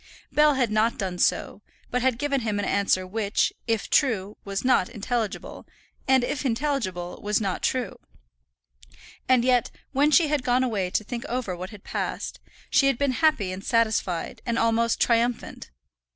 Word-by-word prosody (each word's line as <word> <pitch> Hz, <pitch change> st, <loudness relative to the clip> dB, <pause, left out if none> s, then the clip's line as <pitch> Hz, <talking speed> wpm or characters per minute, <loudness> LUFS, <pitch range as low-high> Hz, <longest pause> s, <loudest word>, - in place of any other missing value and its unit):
Bell 300 Hz, -1 st, +4 dB
had 245 Hz, -5 st, +1 dB
not 215 Hz, +2 st, +2 dB
done 185 Hz, -4 st, -3 dB
so, 205 Hz, -, 0 dB, 0.3 s
but 250 Hz, -, 0 dB
had 255 Hz, -2 st, +2 dB
given 280 Hz, 0 st, 0 dB
him 215 Hz, -3 st, -1 dB
an 205 Hz, -, -1 dB
answer 195 Hz, -2 st, +1 dB
which, 205 Hz, +2 st, 0 dB
if 225 Hz, -2 st, 0 dB
true, 210 Hz, -7 st, +1 dB
was 200 Hz, +3 st, -4 dB
not 255 Hz, -8 st, +3 dB
intelligible, 230 Hz, -1 st, -4 dB, 0.4 s
and 265 Hz, -2 st, +4 dB
if 265 Hz, +3 st, -2 dB
intelligible 225 Hz, -9 st, -2 dB
was 210 Hz, 0 st, +1 dB
not 195 Hz, -4 st, -2 dB
true. 250 Hz, -6 st, -1 dB, 1.3 s
And 250 Hz, -2 st, +4 dB
yet, 250 Hz, -2 st, +3 dB, 0.2 s
when 285 Hz, +2 st, +3 dB
she 310 Hz, +1 st, +5 dB
had 295 Hz, -1 st, 0 dB
gone 250 Hz, +1 st, +2 dB
away 205 Hz, -7 st, -1 dB
to 215 Hz, -, 0 dB
think 235 Hz, +2 st, -5 dB
over 245 Hz, -8 st, -3 dB
what 180 Hz, +2 st, -7 dB
had 210 Hz, -2 st, -13 dB
passed, -, -, -4 dB, 0.3 s
she 285 Hz, -1 st, +4 dB
had 270 Hz, -3 st, +2 dB
been 280 Hz, 0 st, +1 dB
happy 255 Hz, -, +2 dB
and 185 Hz, +1 st, -7 dB
satisfied, 220 Hz, -2 st, 0 dB
and 235 Hz, -1 st, -1 dB
almost 230 Hz, 0 st, +2 dB
triumphant. 235 Hz, -, 0 dB
230 Hz, 165 wpm, -25 LUFS, 200-260 Hz, 1.3 s, she